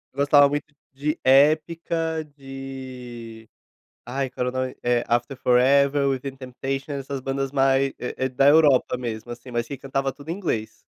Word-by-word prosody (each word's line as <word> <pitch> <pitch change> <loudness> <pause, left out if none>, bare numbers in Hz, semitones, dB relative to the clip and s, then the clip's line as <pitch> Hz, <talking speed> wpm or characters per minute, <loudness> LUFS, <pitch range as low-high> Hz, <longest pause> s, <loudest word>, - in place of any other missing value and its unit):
gostava 145 0 +5
muito 145 +1 -4 0.2
de 150 +4 -2
Epica, 160 +4 +2
de 130 -4 -9 0.6
ai 130 +2 -2
qual 125 0 -3
era - - +1
o 130 +1 -3
nome, 130 0 -4
eh, 120 -1 +2
After 120 +3 0
Forever, 140 +3 +3
Within 135 0 -3
Temptation, 135 +2 -5
essas 140 0 -4
bandas 135 +1 -2
mais 135 0 +2
é 130 +1 -3
é - - 0
da 135 +2 +3
Europa 145 -4 +5
mesmo, 120 -1 -5
assim, 125 +1 -9
mas 120 0 -2
que 140 - -6
cantava 135 +1 -2
tudo 145 +2 -13
em - - 0
inglês. 160 - -3
135 Hz, 165 wpm, -24 LUFS, 125-140 Hz, 0.6 s, gostava